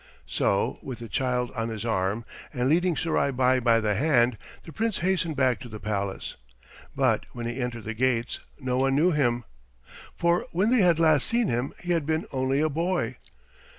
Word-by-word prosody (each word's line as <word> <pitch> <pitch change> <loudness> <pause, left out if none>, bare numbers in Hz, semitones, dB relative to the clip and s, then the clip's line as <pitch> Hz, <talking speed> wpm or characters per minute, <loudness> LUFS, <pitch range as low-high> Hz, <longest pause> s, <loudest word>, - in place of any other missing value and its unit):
So, - - 0
with 130 -3 -6
the 115 - -8
child 125 +1 -1
on 115 0 -3
his 110 -1 -5
arm, 105 +1 -1 0.3
and 125 0 -1
leading 175 +2 +2
Surai 160 -3 +1
Bai 130 -1 +2
by 115 -2 +3
the 105 -2 +1
hand, 120 -1 +3 0.3
the 165 - -11
Prince 225 +4 -1
hastened 180 -4 +1
back 130 -4 +2
to 120 - -9
the 110 -1 -8
palace. 100 -1 -3 0.6
But - - +1
when 120 -1 -5
he 120 +3 -3
entered 120 -2 -4
the 110 - -4
gates 120 0 0 0.2
no 130 -2 -1
one 135 0 +2
knew 165 +6 +4
him, 120 -6 +1 0.7
for 170 +1 +1
when 195 +7 +2
they 250 -3 +4
had 175 -3 +4
last 155 -4 +3
seen 235 -3 +1
him 120 +4 -2
he 175 - -2
had 165 -4 0
been 160 +1 0
only 130 +1 0
a 155 - +3
boy. 155 -6 -1
130 Hz, 190 wpm, -26 LUFS, 120-160 Hz, 0.7 s, knew